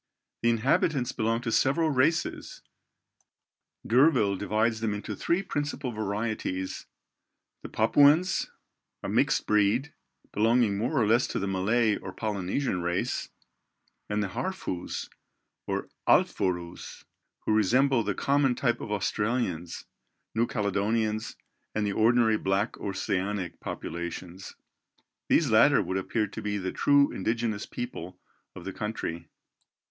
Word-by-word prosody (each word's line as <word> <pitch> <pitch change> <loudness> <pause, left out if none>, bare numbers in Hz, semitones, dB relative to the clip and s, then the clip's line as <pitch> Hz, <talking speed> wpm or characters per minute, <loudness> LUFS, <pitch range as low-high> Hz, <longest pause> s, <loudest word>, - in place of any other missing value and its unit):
The 115 - +3
inhabitants 125 +3 +1
belong 115 0 0
to 120 -2 -3
several 155 +7 +2
races. 150 +5 0 1.2
D'Urville 125 -5 +4
divides 110 +3 0
them 110 -2 -1
into 105 0 -5
three 175 - 0
principal 145 -6 -3
varieties: 105 -3 -3 0.7
the - - -8
Papuans, 160 +6 +4 0.5
a - - -3
mixed - - +2
breed, 105 +7 +2 0.4
belonging 115 0 +3
more 125 +8 0
or 110 - +3
less 115 +4 +3
to - - -3
the 100 - -1
Malay 105 +4 +2
or 95 - -7
Polynesian 100 +1 -2
race; 85 0 -2 0.8
and 105 0 0
the 100 - -3
Harfous 115 - -4 0.6
or - - -2 0.2
Alfourous, 85 -2 0 0.4
who - - 0
resemble 125 +5 +3
the 105 -3 -2
common 140 -2 +2
type 120 -2 0
of 105 - -6
Australians; 105 -4 -2 0.5
New 115 +1 +1
Caledonians 110 +1 -1 0.4
and 105 -1 0
the 100 - -1
ordinary 110 0 +4
black 95 +3 0
Oceanic 95 -1 -2
populations. 85 +2 -6 0.7
These - - +3
latter - - +6
would 95 - -2
appear 105 +3 -1
to 100 - -8
be 105 0 -2
the 95 -2 -3
true 140 0 +4
indigenous 110 +1 -2
people 90 -7 -6 0.4
of 85 - -10
the 95 - -5
country. 85 -7 -4
110 Hz, 120 wpm, -28 LUFS, 100-120 Hz, 1.2 s, latter